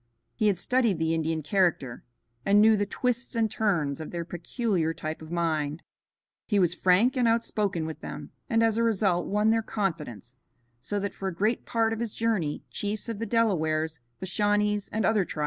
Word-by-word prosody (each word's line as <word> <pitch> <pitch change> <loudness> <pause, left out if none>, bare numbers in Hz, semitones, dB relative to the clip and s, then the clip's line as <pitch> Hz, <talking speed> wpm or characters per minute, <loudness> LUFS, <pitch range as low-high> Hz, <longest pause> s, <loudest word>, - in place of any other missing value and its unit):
He 215 - +1
had 200 -3 +2
studied 235 -1 +1
the 160 0 0
Indian 160 -1 -1
character 155 -8 0 0.4
and 200 +5 +4
knew 220 +1 +6
the 205 -1 0
twists 250 +3 -2
and 225 -2 +1
turns 170 -11 0
of 155 - -6
their 170 -1 -4
peculiar 175 -1 -1
type 155 +1 -5
of 160 - -10
mind. 155 -3 -1 0.6
He 205 - +1
was 180 -3 +3
frank 190 +9 +3
and 250 -2 +2
outspoken 210 -7 0
with 160 0 -6
them, - - -7 0.2
and 230 -2 +3
as 225 -1 +2
a 230 - +2
result 195 -6 +1
won 210 +2 +2
their 225 0 +2
confidence, 155 - -4 0.5
so 205 +12 -3
that 200 0 -3
for 195 - -5
a 185 - -3
great 215 +6 0
part 225 -1 +1
of 225 - -4
his 230 -2 -3
journey 210 -10 -1
chiefs 210 +2 -3
of 225 -3 -4
the 230 - -3
Delawares, 160 -9 +1 0.2
the - - -6
Shawnees 205 +1 +1
and 220 -1 0
other 220 -1 +3
tribes - - -11
traveled - - -25
with - - -6
him. - - -3
200 Hz, 205 wpm, -27 LUFS, 165-225 Hz, 0.6 s, knew